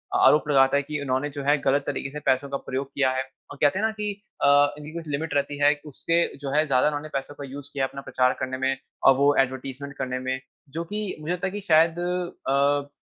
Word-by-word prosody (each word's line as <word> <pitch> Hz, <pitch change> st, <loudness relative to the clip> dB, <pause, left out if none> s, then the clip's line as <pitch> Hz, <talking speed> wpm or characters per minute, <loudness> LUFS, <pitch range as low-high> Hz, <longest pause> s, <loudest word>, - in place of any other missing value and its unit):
आरोप 150 Hz, 0 st, +5 dB
लगाता 135 Hz, 0 st, +5 dB
है, 140 Hz, -, 0 dB
कि 150 Hz, +1 st, -4 dB
उन्होने 135 Hz, +1 st, -1 dB
जो 140 Hz, -1 st, -6 dB
है 145 Hz, +2 st, +3 dB
गलत 140 Hz, +1 st, +2 dB
तरीके 140 Hz, 0 st, -2 dB
से 150 Hz, -, -6 dB
पैसों 135 Hz, +2 st, +2 dB
का 140 Hz, -, -2 dB
प्रयोग 135 Hz, 0 st, -4 dB
किया 130 Hz, -2 st, +2 dB
है। 130 Hz, 0 st, -1 dB, 0.3 s
और 145 Hz, -, -9 dB
कहते 145 Hz, +6 st, +3 dB
है 220 Hz, -, +1 dB
ना 220 Hz, -, +1 dB
की 210 Hz, -1 st, -3 dB, 0.3 s
अ, 145 Hz, +1 st, +5 dB
इनकी 150 Hz, +1 st, -9 dB
कुछ 165 Hz, -1 st, -6 dB
लिमिट 150 Hz, +2 st, -3 dB
रहती 145 Hz, 0 st, 0 dB
है 145 Hz, +1 st, +6 dB
उसके 165 Hz, +4 st, 0 dB, 0.2 s
जो 140 Hz, -1 st, -5 dB
है 155 Hz, +1 st, +4 dB
ज्यादा 130 Hz, 0 st, +3 dB
उन्होने 150 Hz, +1 st, -3 dB
पैसों 135 Hz, +1 st, -4 dB
का 140 Hz, -, -7 dB
यूज़ 140 Hz, +1 st, -8 dB
किया 135 Hz, -1 st, -1 dB
है, -, -, -5 dB
अपना 140 Hz, -, -8 dB
प्रचार 130 Hz, -1 st, +1 dB
करने 130 Hz, 0 st, -3 dB
में 130 Hz, 0 st, 0 dB, 0.3 s
और 135 Hz, -, +7 dB
वो 145 Hz, +1 st, +4 dB
एडवर्टाइज़मेंट 135 Hz, +2 st, -4 dB
करने 130 Hz, -1 st, -2 dB
में। 130 Hz, 0 st, -2 dB, 0.3 s
जो 165 Hz, +4 st, -4 dB
कि 205 Hz, +2 st, -4 dB
मुझे 165 Hz, +4 st, -2 dB
लगता 180 Hz, +1 st, -2 dB
है -, -, -4 dB
कि 205 Hz, +1 st, -5 dB
शायद 165 Hz, +1 st, +4 dB
अ, 145 Hz, -5 st, 0 dB
145 Hz, 245 wpm, -25 LUFS, 135-155 Hz, 0.3 s, और